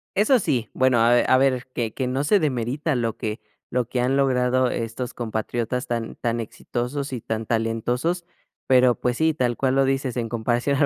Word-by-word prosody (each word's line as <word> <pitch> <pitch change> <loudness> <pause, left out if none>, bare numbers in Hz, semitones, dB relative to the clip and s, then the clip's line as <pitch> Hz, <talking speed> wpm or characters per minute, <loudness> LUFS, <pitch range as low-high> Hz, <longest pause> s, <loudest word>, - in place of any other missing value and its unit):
Eso 220 +6 +4
sí, 120 - -1
bueno, 130 -2 +3
a 115 - +5
ver 120 - +3
a 130 - +6
ver 130 -2 +1
que 115 -2 -2
que 130 - -2
no 130 +3 -1
se 200 +7 +4
demerita 140 +1 -1
lo 115 -3 -1
que 110 +2 -4 0.3
lo 125 +1 +1
que 125 - -1
han 125 +2 +1
logrado 130 -2 +2
estos 120 +2 -4
compatriotas 120 +2 -3
tan 115 -1 -3
tan 120 0 -2
exitosos 125 +4 -4
y 125 - -3
tan 110 0 -3
talentosos. 120 +10 -1 0.4
Pero, 125 -2 +5
pues 125 0 0
sí, 160 0 +2
tal 120 -3 0
cual 130 -1 +1
lo 135 - +4
dices, 135 -2 -1
en 115 - -1
comparación 120 +4 0
a - - 0
125 Hz, 200 wpm, -23 LUFS, 120-135 Hz, 0.4 s, a